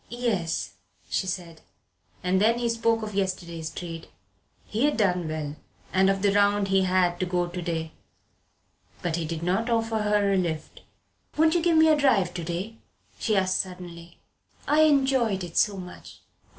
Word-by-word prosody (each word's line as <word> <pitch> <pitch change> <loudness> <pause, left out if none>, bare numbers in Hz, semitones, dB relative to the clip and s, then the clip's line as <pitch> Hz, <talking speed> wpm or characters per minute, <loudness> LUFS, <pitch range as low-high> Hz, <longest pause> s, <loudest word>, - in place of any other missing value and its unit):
"Yes," 190 - -2 0.4
she 190 - 0
said. 175 -3 -5 0.6
And 185 +1 +2
then 230 +3 +4
he 240 0 -1
spoke 230 -1 +1
of 210 -1 -5
yesterday's 175 -4 -3
trade 165 -2 -7 0.6
he 225 +6 0
had 295 - +1
done 180 -6 +1
well; 155 -1 -4 0.4
and 190 +1 +4
of 195 0 0
the 200 -1 +3
round 205 0 +3
he 195 0 +3
had 180 -1 +2
to 185 - -1
go 180 0 0
to 175 +1 -6
day. 160 -2 -3 1.1
But 170 -2 0
he 165 - -2
did 165 +1 -4
not 195 +7 0
offer 225 -1 0
her 210 -1 +2
a - - +2
lift. 160 -4 -3 0.6
"Won't 320 +1 +4
you 345 - +2
give 335 -1 +3
me 320 0 +6
a 315 - +6
drive 230 -12 +2
to 175 - -5
day?" 180 +7 -4 0.4
she 215 -3 +1
asked 185 -1 +1
suddenly. 175 -2 -7 0.5
"I 300 +1 +4
enjoyed 265 -9 +2
it 170 -2 -8
so 205 -2 +2
much." 180 -1 -10
190 Hz, 175 wpm, -26 LUFS, 175-225 Hz, 1.1 s, me